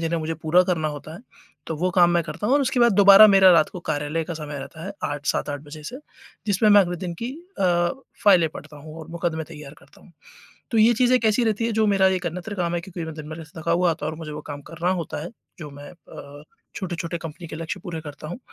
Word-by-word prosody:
जिन्हें 165 0 -1
मुझे 160 +1 -3
पूरा 160 +3 +3
करना 165 -4 0
होता 150 +1 -8
है 185 - -10 0.5
तो 160 - -4
वो 180 +4 0
काम 175 -1 +6
मैं 175 0 +2
करता 205 - -5
हूँ 260 - +3
और 290 - +4
उसके 265 -1 0
बाद 235 -1 +5
दोबारा 200 +1 +9
मेरा 195 -2 +7
रात 165 -3 +4
को 180 - -8
कार्यालय 150 +2 -2
का 170 - -5
समय 150 -2 -6
रहता 155 +4 -9
है 200 - -5
8, 145 0 -4
7-8 145 -1 -1
बजे 150 +1 -11
से 250 +9 -7 0.5
जिसमें 210 +1 +2
मैं 205 0 +8
अगले 175 -1 -3
दिन 175 -1 -5
की 245 +2 -3 0.3
अ, 175 -2 +2 0.4
फाइलें 180 -6 +6
पढ़ता 150 0 -10
हूँ 155 +2 -11
और 160 - -11
मुकदमे 165 -1 -3
तैयार 150 -2 -11
करता - - -21
हूँ। 175 - -19 0.6
तो 225 - +2
ये 225 +2 +6
चीज़ें 250 +2 +3
कैसी 220 +2 +2
रहती 220 0 0
है 230 - -1
जो 220 0 +2
मेरा 195 -1 +4
एक 175 - -7
अन्यत्र 180 +5 -5
काम 175 -3 -1
है 175 - -1
क्योंकि 175 -1 -7
मैं 160 - -6
दिन-भर 155 +1 -8
से 160 +1 -12
थका 170 +1 0
हुआ 175 0 +3
आता 155 -2 -3
हूँ 155 - -3
और 160 - -9
मुझे 155 -2 -7
वो 150 - -6
काम 145 0 -7
करना 170 +2 -2
होता 155 -2 -5
है - - -7 0.3
जो 150 -2 -7
मैं 145 +1 -11
अ, 145 -3 -13 0.3
छोटे-छोटे 175 -2 -4
कंपनी 165 +1 -8
के 155 - -7
लक्ष्य 165 +3 -5
पूरे 165 -2 -6
करता 150 -1 -9
हूँ, 175 - -6
170 Hz, 255 wpm, -23 LUFS, 155-190 Hz, 0.6 s, दोबारा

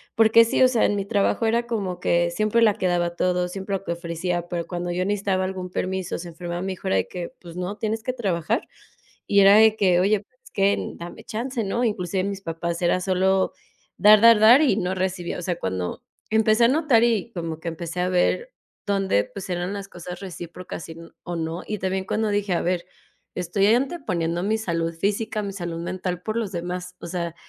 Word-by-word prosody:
porque 225 +1 +6
sí, 230 - 0
o 255 - +8
sea, 245 -3 +1
en 205 - +1
mi 195 - -2
trabajo 205 +2 +1
era 235 +2 +1
como 195 -7 -3
que 170 0 +2
siempre 215 +5 +1
la 215 -3 +5
que 190 -3 -1
daba 175 -1 0
todo, 180 0 +1
siempre 195 +2 -4
lo 190 - -15
que 170 - -1
ofrecía. 170 +1 -3
Pero 170 -2 -3
cuando 175 -1 -3
yo 180 +1 -1
necesitaba 195 -2 0
algún 185 -1 -5
permiso, 185 0 -3
se 175 - -7
enfermaba 175 +1 -5
mi 190 0 -2
hijo, 190 +1 -8
era - - +2
de - - 0
que: 180 +4 -6
"Pues 170 -1 -11
no, 180 +3 -4
tienes 220 +1 -2
que 255 - -2
trabajar". 205 -2 -1 0.6
Y 200 - +4
era 200 +1 +8
de 220 0 +6
que: 185 -4 +3
"Oye, 200 +2 +3
pues 250 +5 -28
es - - -16
que 200 0 +2 0.2
dame 170 +1 -9
chance, 235 +1 -3
¿no?" 235 +5 -1
Inclusive 190 -4 -1
mis 200 -1 -4
papás 170 +1 -4
era 175 +1 +2
solo 190 +1 +1 0.5
dar, 210 0 +7
dar, 230 0 +8
dar 235 +6 +8
y 255 -10 +3
no 185 -2 -1
recibía. 185 -2 -2
O 180 - -5
sea, 175 -1 -2
cuando 95 - -3 0.3
empecé 220 +1 +3
a 235 - +6
notar 280 -5 +3
y 230 -1 +1
como 165 -4 -5
que 170 - -5
empecé 170 +1 -5
a 180 - +1
ver 185 - +1 0.3
dónde, 195 - +1
pues 195 -1 -9
eran 180 +2 -2
las 200 -1 -6
cosas 180 -1 -8
recíprocas 175 -2 -8
y, 160 - -9 0.3
o 175 - -4
no. 165 +2 -3
Y 210 - -3
también 190 0 -2
cuando 220 +2 -1
dije: 205 -2 0
"A 175 - +1
ver, 175 0 -1 0.5
estoy 180 +3 0
anteponiendo 185 - 0
mi 215 +3 +1
salud 165 -5 -2
física, 210 +4 -1
mi 200 - -4
salud 170 -3 -4
mental 180 0 -3
por 220 +1 -3
los 220 -4 -2
demás". 180 +1 -5
O - - -7
sea, 170 -1 -3
190 Hz, 215 wpm, -24 LUFS, 175-215 Hz, 0.6 s, o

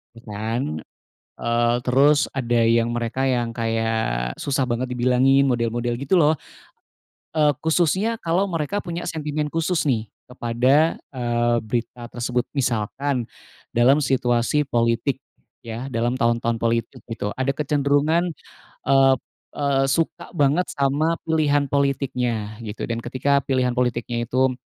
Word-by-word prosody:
gitu 115 - -14
kan, 105 -6 -2 0.6
eee, 120 0 +1
terus 140 +4 +3
ada 120 -3 +1
yang 115 0 +3
mereka 120 +3 -1
yang 120 -2 0
kayak 115 - -1
susah 140 -1 0
banget 125 +1 -2
dibilangin 130 +3 +4
model-model 120 -1 -1
gitu 140 +7 +1
loh, 155 -3 +5 1.0
eee, 150 -2 +3
khususnya 185 +8 +1
kalau 185 +4 0
mereka 165 +5 -2
punya 175 -1 -5
sentimen 150 -2 -2
khusus 165 +1 0
nih 115 -5 0 0.2
kepada, 125 +6 +2 0.2
eee, 120 -1 +1
berita 120 +1 -4
tersebut. 120 0 -1
Misalkan 130 +1 -1 0.5
dalam 135 +5 +4
situasi 130 +2 +1
politik 120 +2 0 0.4
ya, 115 +3 -6
dalam 120 0 -1
tahun-tahun 115 -1 +1
politik 115 0 -1
gitu, 115 -3 -4
ada 135 +1 0
kecenderungan, 150 +3 +1 0.6
eee 135 -1 +5 0.4
eee, 140 -2 +1
suka 165 +3 -1
banget 145 +3 +3
sama 145 +4 +1
pilihan 145 -3 +2
politiknya 125 -6 -1
gitu, 105 -1 -6
dan 115 0 -2
ketika 140 +3 +1
pilihan 130 -2 +1
politiknya 120 -1 -1
itu 130 +1 +2
130 Hz, 125 wpm, -23 LUFS, 120-145 Hz, 1.0 s, loh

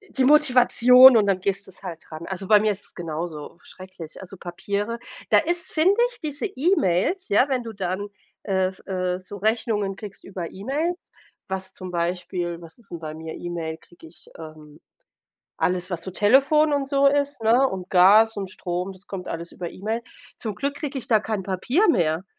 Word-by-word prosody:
e...die 275 -11 -2
Motivation 255 -3 +7
und 210 - +4
dann 195 -2 +1
gehst 195 +1 -2
du's 190 - -14
halt 170 -4 -9
ran. 155 +2 -7
Also 190 0 -5
bei 210 -1 +7
mir 215 -1 +2
ist 200 - -9
es - - -15
genauso 165 -2 -6
schrecklich, 185 -4 -11
also 190 +1 -10
Papiere 200 +6 -4 0.3
da - - +6
ist, 345 +3 -1
finde 340 +5 +4 0.2
ich, 480 - -13
diese 300 +6 -3
E-Mails, 350 - +1
ja, 250 +7 +3
wenn 255 -2 0
du 225 -1 -7
dann, 190 +1 -3 0.4
äh, 190 -2 +1
f 190 - -12
äh, 185 -1 -2
so 185 +2 -10
Rechnungen 210 -2 0
kriegst 205 -2 -10
über 180 -4 -6
E-Mails, 295 - -2 0.5
was 190 0 -5
zum 185 -1 -8
Beispiel 175 0 -3
was 165 +6 -14
ist 230 - -20
denn 170 - -7
bei 155 -1 -6
mir? 160 0 -7
E-Mail, 165 -2 -5
kriege 170 0 -18
ich, 160 - -18
ähm, 155 -1 -12 0.8
alles, 180 0 -1
was 170 -2 -3
so 190 - -6
Telefon 275 - +4
und 280 -1 0
so 280 0 +3
ist, 285 -2 +1
ne? 245 +5 +4
Und 185 -1 -6
Gas 205 +5 +6
und 195 -2 -4
Strom, 180 +1 -4
das 190 +1 -16
kommt 185 -2 -7
alles 170 +1 -6
über 175 -2 -6
E-Mail. 220 +5 -4 0.3
Zum 215 -4 -5
Glück 280 +1 -2
kriege 285 -2 -4
ich 245 - -7
da 220 -5 +3
kein 215 -2 -3
Papier 240 - +1
mehr, 170 - +1
195 Hz, 195 wpm, -23 LUFS, 180-250 Hz, 0.8 s, Motivation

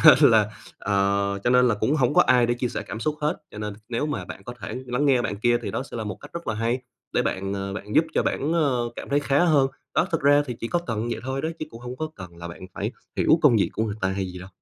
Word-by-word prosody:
cho - - +10
nên - - +8
là, - - +5 0.3
ờ 100 0 +1
cho 120 - +3
nên 125 0 +5
là 115 - +3
cũng 110 +7 +1
hổng 135 -2 +2
có - - +7
ai 125 -2 +4
để 120 - +1
chia 125 0 -1
sẻ 105 - -4
cảm 110 - -6
xúc 150 +4 0
hết, 150 0 0
cho - - -10
nên 105 -1 -4
nếu 120 +5 -1
mà 150 - -3
bạn - - -9
có 120 - -7
thể - - -5
lắng 125 +4 0
nghe 130 -3 +4
bạn 100 - -2
kia 120 +3 +3
thì - - -3
đó - - -2
sẽ - - -6
là 110 - -3
một 105 -3 -4
cách - - -12
rất 170 0 -6
là 110 - 0
hay, 115 +3 0 0.3
để - - +2
bạn, 95 +1 -2
ờ, 100 0 -3
bạn 105 +1 -6
giúp 160 - +6
cho - - +3
bản, 150 +4 0
ờ, 140 -7 +2
cảm - - -7
thấy 145 +1 +2
khá 145 +3 +3
hơn. 145 -6 +4 0.3
Đó, - - +3
thực - - 0
ra 145 +1 +5
thì 125 - -4
chỉ 115 - -3
có 175 - +1
cần 115 +1 -2
vậy 115 - -3
thôi 135 +1 -2
đấy, 160 +1 -2
chứ - - -3
cũng 115 - -11
hông 125 +1 -6
có 155 +2 -3
cần 90 -2 -10
là 85 0 -7
bạn 85 +2 -9
phải - - -3 0.2
hiểu 160 - +4
công 140 -7 +6
việc 100 - +2
của 110 - 0
người 105 -2 -2
ta 95 - +1
hay 95 0 -2
gì 90 - -8
đâu. 90 +1 -9
120 Hz, 310 wpm, -25 LUFS, 105-140 Hz, 0.3 s, cho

